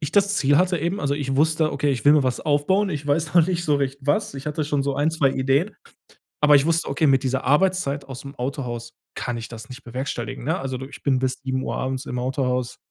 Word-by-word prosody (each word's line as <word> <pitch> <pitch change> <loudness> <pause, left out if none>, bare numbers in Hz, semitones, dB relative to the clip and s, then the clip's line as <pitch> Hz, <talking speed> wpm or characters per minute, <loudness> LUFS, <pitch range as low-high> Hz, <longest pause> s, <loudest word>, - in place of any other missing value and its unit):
ich 150 - -3
das 200 0 +3
Ziel 145 +1 +3
hatte 180 0 +2
eben 170 +6 -1
also, 140 -3 0
ich 135 -2 -2
wusste: 155 +1 +2
„Okay, 145 +1 0
ich 125 - -4
will 145 - +7
mir 150 - +4
was 125 - 0
aufbauen. 190 +8 +1
Ich 145 -2 -4
weiß 155 +3 0
noch 170 -2 +6
nicht 175 -2 -1
so 150 -3 +2
recht 140 0 -2
was.“ 145 +3 0
Ich 135 - -7
hatte 150 0 -1
schon 145 -1 0
so 140 0 -2
1, 145 +3 +2
2 145 -5 +2
Ideen. 135 +9 +1 0.7
Aber 150 0 +7
ich 140 +2 +3
wusste: 165 0 +1
„Okay, 150 +3 +1
mit 135 -1 +4
dieser 135 0 -1
Arbeitszeit 145 -2 +2
ausm 140 +1 -9
Autohaus 125 -2 -4 0.2
kann 120 -1 -3
ich 115 - -7
das 115 +3 -10
nicht 130 +2 -9
bewerkstelligen“, 120 -2 -5
ne? 160 +4 0
Also, 135 -1 -4
du 130 - -6
ich 140 - -12
bin 135 -2 +2
bis 130 0 -1
19:00 130 0 -2
abends 130 +1 -2
im 125 - -4
Autohaus. 125 -1 -1
140 Hz, 240 wpm, -23 LUFS, 130-155 Hz, 0.7 s, will